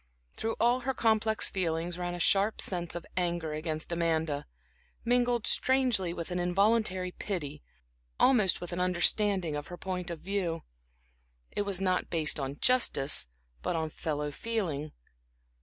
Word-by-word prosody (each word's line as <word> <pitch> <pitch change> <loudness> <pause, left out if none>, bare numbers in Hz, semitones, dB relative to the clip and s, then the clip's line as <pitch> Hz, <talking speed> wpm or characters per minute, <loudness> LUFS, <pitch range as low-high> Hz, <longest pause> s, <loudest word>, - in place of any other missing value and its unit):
Through 225 0 -3
all 240 +2 +3
her 260 +1 -2
complex 220 -1 +2
feelings 170 -1 -2
ran 175 0 -3
a - - -6
sharp 200 +4 +2
sense 175 -3 -1
of 175 - -5
anger 170 -3 -1
against 155 +1 -2
Amanda, 160 - -1 0.6
mingled 245 -1 +2
strangely 250 -9 +4
with 170 +1 -6
an 180 - -1
involuntary 185 0 +1
pity, 150 -8 -5 0.6
almost 220 -8 +4
with 175 0 -6
an 175 - -3
understanding 180 -1 +2
of 145 0 -5
her 175 - -8
point 180 -1 -4
of 170 -2 -5
view. 180 -4 -2 0.9
It 205 - -2
was 195 -2 +1
not 185 -1 0
based 160 -2 +2
on 135 +1 -4
justice, 145 - +3 0.3
but - - -2
on 160 -1 -2
fellow 150 -2 -3
feeling. 160 -7 -3
180 Hz, 145 wpm, -30 LUFS, 160-210 Hz, 0.9 s, strangely